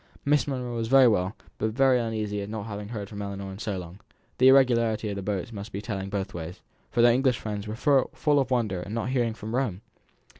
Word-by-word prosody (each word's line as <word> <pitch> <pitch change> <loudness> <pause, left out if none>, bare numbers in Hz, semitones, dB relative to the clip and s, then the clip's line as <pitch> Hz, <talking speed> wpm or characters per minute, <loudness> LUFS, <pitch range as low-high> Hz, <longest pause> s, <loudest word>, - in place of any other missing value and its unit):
Miss 145 +1 +3
Monro 125 -3 -3
was 115 -1 -2
very 135 +1 +7
well, 100 -2 +1 0.2
but 110 0 -1
very 130 0 +4
uneasy 110 -3 -2
at 100 - -6
not 110 -1 -5
having 105 -2 -6
heard 105 -3 -5
from 105 0 -7
Ellinor 100 -1 -5
for 95 - -10
so 105 -3 -3
long; 90 +1 -8 0.4
the 130 - +6
irregularity 115 -5 +4
of 100 - -3
the 100 - -4
boats 100 +2 -3
must 105 +1 -7
be 100 - -4
telling 100 -3 -4
both 100 -1 -3
ways, 85 +1 -6 0.3
for 120 - +2
their 120 0 +7
English 130 -1 +2
friends 105 -1 -5
were 105 - -4
full 145 +2 +2
of 135 -1 0
wonder 110 -8 0
at 100 - -7
not 115 +2 -2
hearing 120 -4 0
from 110 +2 -7
Rome. 120 -7 -1
110 Hz, 230 wpm, -27 LUFS, 100-125 Hz, 0.4 s, very